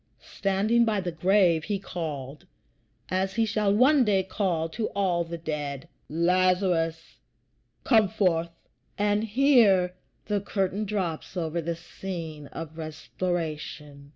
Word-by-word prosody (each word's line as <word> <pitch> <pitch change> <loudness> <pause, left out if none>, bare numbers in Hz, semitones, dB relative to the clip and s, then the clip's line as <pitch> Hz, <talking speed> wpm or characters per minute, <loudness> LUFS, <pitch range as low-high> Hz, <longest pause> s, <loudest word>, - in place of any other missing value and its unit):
Standing 205 +4 +2
by 220 -3 +1
the 180 -2 -3
grave 175 -1 +3
he 205 -2 -1
called, 150 -7 -6 0.6
as 190 +1 -1
he 225 - +3
shall 215 -2 +1
one 260 +6 +5
day 200 -4 +2
call 185 -4 -1
to 215 +6 -2
all 180 -4 +1
the 170 0 -6
dead, 150 -4 -4 0.2
"Lazarus, 175 -1 +1 0.6
come 220 -4 +5
forth!" 180 -5 +1 0.5
And 205 +1 +1
here 220 -7 +4 0.3
the 205 -1 0
curtain 195 +1 -1
drops 185 -4 -3
over 170 0 -1
the 170 +1 -2
scene 165 -3 -7
of 160 +1 -8
restoration. 155 -3 -4
180 Hz, 125 wpm, -27 LUFS, 165-205 Hz, 0.6 s, one